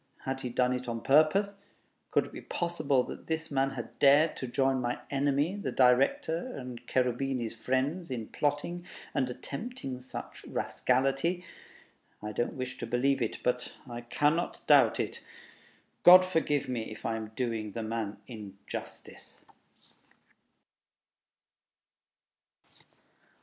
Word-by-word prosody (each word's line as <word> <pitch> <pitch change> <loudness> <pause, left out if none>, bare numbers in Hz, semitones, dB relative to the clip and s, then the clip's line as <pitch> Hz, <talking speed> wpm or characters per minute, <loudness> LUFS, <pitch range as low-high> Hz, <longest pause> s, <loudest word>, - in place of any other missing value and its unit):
Had 130 0 -3
he 125 - -3
done 125 +1 +2
it 125 0 -4
on 115 -1 -3
purpose?... 155 - +4 0.6
Could - - +2
it - - -12
be - - -8
possible 155 -7 0
that - - -9
this 160 0 -2
man 135 -1 +2
had 120 -4 -8
dared 145 +3 +6
to 130 - -4
join 135 +1 +1
my 120 0 -1
enemy, 145 +5 +1
the 205 - -3
Director, 135 - +3
and 125 -2 -7
Cherubini's 125 -1 0
friends, 130 +9 -1
in 120 -4 -3
plotting 145 +8 -2 0.3
and 130 -2 +1
attempting 135 - -6
such 130 - -8
rascality? 135 +8 0 0.7
I 105 - -5
don't 120 +3 -1
wish 130 0 -5
to - - -4
believe 130 +4 +2
it... - - -2
but 125 0 -1
I 120 -1 -6
cannot 145 +7 0
doubt - - +6
it. - - -3 0.8
God 185 +1 +10
forgive 160 -6 0
me 120 -3 -3
if 110 - -10
I 115 - 0
am 110 -1 -4
doing 115 -5 -2
the 115 - -3
man 110 -2 -3
injustice! 100 -5 -9
130 Hz, 130 wpm, -30 LUFS, 120-145 Hz, 0.8 s, God